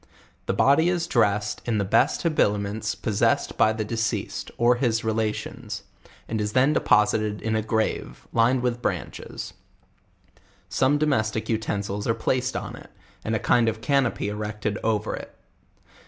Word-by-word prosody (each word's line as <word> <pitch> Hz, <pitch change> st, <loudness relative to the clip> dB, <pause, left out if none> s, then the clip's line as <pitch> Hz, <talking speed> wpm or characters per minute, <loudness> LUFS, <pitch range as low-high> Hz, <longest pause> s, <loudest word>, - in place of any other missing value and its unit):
The -, -, +1 dB
body 150 Hz, +5 st, +4 dB
is 175 Hz, -2 st, 0 dB
dressed 105 Hz, -8 st, +1 dB
in 115 Hz, -3 st, 0 dB
the 100 Hz, -, 0 dB
best 125 Hz, +8 st, +2 dB
habiliments 105 Hz, -, 0 dB
possessed 105 Hz, -3 st, 0 dB
by 110 Hz, -, +4 dB
the 110 Hz, -1 st, -3 dB
deceased, 115 Hz, 0 st, -2 dB
or 120 Hz, +1 st, +4 dB
his 115 Hz, -3 st, +1 dB
relations, 110 Hz, -1 st, -3 dB, 0.4 s
and 110 Hz, -1 st, -2 dB
is 105 Hz, 0 st, -2 dB
then 135 Hz, +4 st, +4 dB
deposited 105 Hz, -2 st, +2 dB
in 110 Hz, -1 st, -1 dB
a 110 Hz, -, +1 dB
grave, 110 Hz, -, -2 dB
lined 120 Hz, +2 st, +3 dB
with 120 Hz, -1 st, -1 dB
branches; -, -, -4 dB, 1.2 s
some 135 Hz, +2 st, +2 dB
domestic 110 Hz, -8 st, 0 dB
utensils 105 Hz, -2 st, -2 dB
are 115 Hz, -, +2 dB
placed 130 Hz, -1 st, -1 dB
on -, -, -4 dB
it, -, -, -13 dB, 0.3 s
and 110 Hz, -, -1 dB
a -, -, 0 dB
kind 120 Hz, +1 st, +3 dB
of 110 Hz, 0 st, -5 dB
canopy 135 Hz, -6 st, +1 dB
erected 105 Hz, 0 st, -3 dB
o^ 110 Hz, -1 st, +1 dB
er -, -, -3 dB
it. -, -, -10 dB
110 Hz, 155 wpm, -25 LUFS, 105-125 Hz, 1.2 s, body